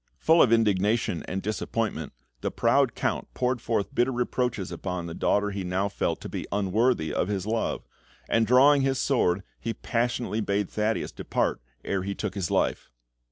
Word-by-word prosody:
Full 165 +1 +5
of 120 - +5
indignation 105 -3 +2
and 95 +1 -3
disappointment, 105 +1 -2 0.3
the - - -2
proud - - +2
Count - - -2
poured 125 -1 0
forth 110 -4 -1
bitter 125 +2 +2
reproaches 125 -4 -1
upon 90 -2 -4
the 85 - -6
daughter 105 +4 +1
he 100 -1 -4
now 95 +3 0
felt - - -1
to - - -6
be - - -5
unworthy 100 -2 +1
of - - 0
his 100 -2 -2
love; 110 +1 -1 0.4
and 115 -1 +2
drawing 140 +3 +6
his 135 0 +1
sword, 95 -10 +1 0.2
he 115 0 -3
passionately 120 -2 -1
bade 100 -2 -1
Thaddeus 110 +1 -1
depart - - -1 0.2
ere 100 -1 -1
he 100 +1 -3
took 105 -4 -3
his 95 -4 -2
life. - - 0
105 Hz, 170 wpm, -27 LUFS, 95-120 Hz, 0.4 s, drawing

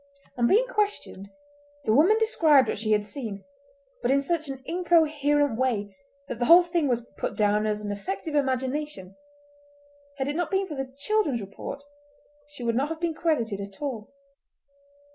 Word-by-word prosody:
On 240 -1 +2
being 450 - +4
questioned 415 - -2 0.6
the 215 - +3
woman 345 - +5
described 320 - +4
what - - -2
she 215 0 -2
had 210 -1 +2
seen, 210 -4 -6 0.6
but 240 - 0
in 275 +1 +4
such 315 +2 -1
an 265 -1 -7
incoherent 295 -7 +2
way 205 -6 -1 0.3
that 240 - -6
the 240 - +1
whole 340 +5 +8
thing 340 -3 0
was 240 -2 -1
put - - -3
down 210 0 +2
as 210 0 -2
an 205 - -3
effect 345 - -5
of 310 - -3
imagination; 265 -7 -2 1.0
had 265 0 -2
it 290 - -2
not 350 0 -1
been 385 0 +1
for 320 - -6
the 270 -2 -5
children's 310 - 0
report 210 +7 -7 0.6
she 290 -4 -9
would 230 -1 +1
not 275 +5 0
have 325 0 -5
been 340 -1 -1
credited 235 - -1
at 200 -1 -9
all. 250 -8 -4
275 Hz, 175 wpm, -26 LUFS, 220-325 Hz, 1.0 s, whole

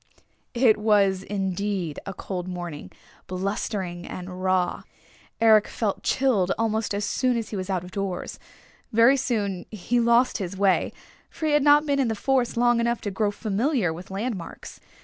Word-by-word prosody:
It 235 -3 +5
was 200 -3 +3
indeed 195 -4 -2
a 195 - -4
cold 180 -1 -5
morning, 175 - -6 0.4
blustering 185 -1 -3
and 185 0 -7
raw. 185 -1 +1 0.6
Eric 220 -2 +5
felt 210 -4 -2
chilled 220 -9 +1
almost 220 -2 0
as 205 +1 -1
soon 250 -2 +1
as 225 -2 -4
he - - -5
was 185 0 -4
out 185 -2 -1
of 180 - -10
doors. 195 -2 -4 0.5
Very 230 +5 +6
soon 205 -8 -2
he 225 +4 -1
lost 235 +2 +3
his 190 -1 -4
way, 195 -1 +2 0.4
for 315 - -5
he 310 - +2
had 295 0 +4
not 295 +1 +5
been 280 -1 +1
in 265 - +2
the 225 - -1
forest 255 +1 0
long 240 0 +3
enough 235 0 0
to 205 - -3
grow 205 +2 0
familiar 215 - 0
with 175 +3 -10
landmarks. 195 -2 -5
205 Hz, 170 wpm, -25 LUFS, 185-235 Hz, 0.6 s, Very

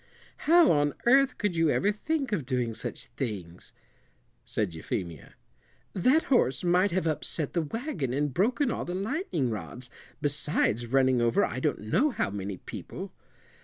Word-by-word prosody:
"How 340 0 +7
on 145 -1 +2
earth 265 +2 +4
could 205 -4 -1
you 165 -1 +3
ever 200 +7 +2
think 275 +4 -2
of 195 -9 0
doing 125 -4 -1
such - - -6
things?" 100 -9 -6 0.8
said 100 -6 -1
Euphemia. 80 -1 -5 0.6
"That 260 - +3
horse 185 - +2
might 180 +3 +3
have 185 -2 -1
upset 155 -1 -1
the 170 - +1
wagon 170 - -3
and 145 +1 -1
broken 240 - +1
all - - -2
the 175 - -4
lightning 195 - -1
rods, 115 +6 -6 0.3
besides 140 -5 +1
running 130 0 +3
over 115 0 +3
I 130 - -4
don't 145 +1 -1
know 180 - +2
how 235 - -2
many 100 -1 -4
people." - - -8
150 Hz, 155 wpm, -28 LUFS, -, 0.8 s, How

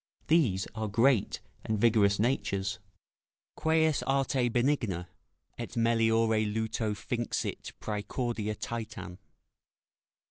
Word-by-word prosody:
These 125 - +3
are 110 -1 -3
great 115 +2 +2 0.2
and 110 - -1
vigorous 105 -2 +4
natures, 100 -5 0 0.8
"Queis 160 -2 +2
arte 135 -2 +2
benigna 115 -8 0 0.5
Et 120 +1 -6
meliore 115 -1 +3
luto 110 0 -1
finxit 120 +2 -3
praecordia 110 0 -2
Titan." 105 -6 -5
115 Hz, 85 wpm, -30 LUFS, 105-120 Hz, 0.8 s, vigorous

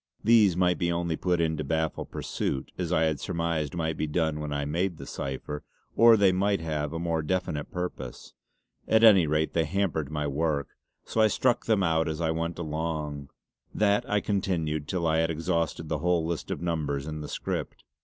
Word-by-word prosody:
These 105 -5 +5
might 90 -3 +2
be 85 0 +1
only 85 -1 -1
put 90 +1 0
in 80 -1 +1
to 75 - -2
baffle 80 +2 -1
pursuit, 65 - -3
as 90 -2 -3
I 80 -2 +3
had 80 -2 +1
surmised 85 -2 -2
might 80 -2 -1
be 75 - -1
done 80 0 0
when 75 -1 -4
I 70 0 -1
made 85 +4 -1
the - - -8
cipher; 70 +2 -5 0.3
or 115 -1 +7
they 100 -2 +5
might 100 +1 +1
have 75 -3 -2
a 80 - -3
more 85 -1 -1
definite 75 -2 -2
purpose. 90 -8 -6 0.5
At 110 0 +4
any 100 -7 +7
rate 75 +1 0
they 80 -1 +2
hampered 80 -4 -1
my 75 -1 -2
work, 75 0 -1 0.4
so 110 - 0
I 110 - +6
struck 120 +3 +1
them 105 -4 +3
out 80 -2 +2
as 80 0 -3
I 80 -1 +1
went 85 +1 -2
along. 75 -3 -3 0.5
That 105 -1 +2
I 105 0 +2
continued 80 -8 -1
till 90 -3 -1
I 80 0 +2
had 80 0 +2
exhausted 80 0 -1
the 75 -1 -2
whole 85 0 +1
list 85 -1 -3
of - - -4
numbers 75 -5 -1
in 75 0 -5
the 75 - -7
script. - - -4
80 Hz, 200 wpm, -27 LUFS, 75-90 Hz, 0.5 s, or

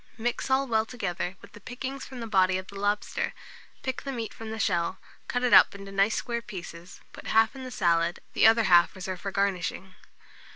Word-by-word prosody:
Mix 240 +3 -2
all 265 +1 +3
well 220 -4 +2
together 185 -6 -3
with - - -13
the - - -13
pickings 265 +2 -6
from 255 -3 -9
the - - -4
body 190 -4 +3
of 185 - -6
the 200 - -13
lobster; 205 +1 -1 0.5
pick 260 -2 -3
the 275 - -5
meat 230 -4 -5
from 225 -1 -8
the 220 - -5
shell, 180 -3 0 0.3
cut 245 0 -1
it 250 - +2
up - - +8
into 195 0 -9
nice 195 +2 +2
square 235 -1 -2
pieces, 175 -4 -9
put - - -10
half 225 +2 +3
in 265 - -8
the 255 - -6
salad, 170 -5 +1
the - - +6
other 225 +1 +5
half 175 -3 +5
reserve 185 -1 -5
for 195 - -4
garnishing. 190 -1 -1
205 Hz, 210 wpm, -27 LUFS, 185-240 Hz, 0.5 s, up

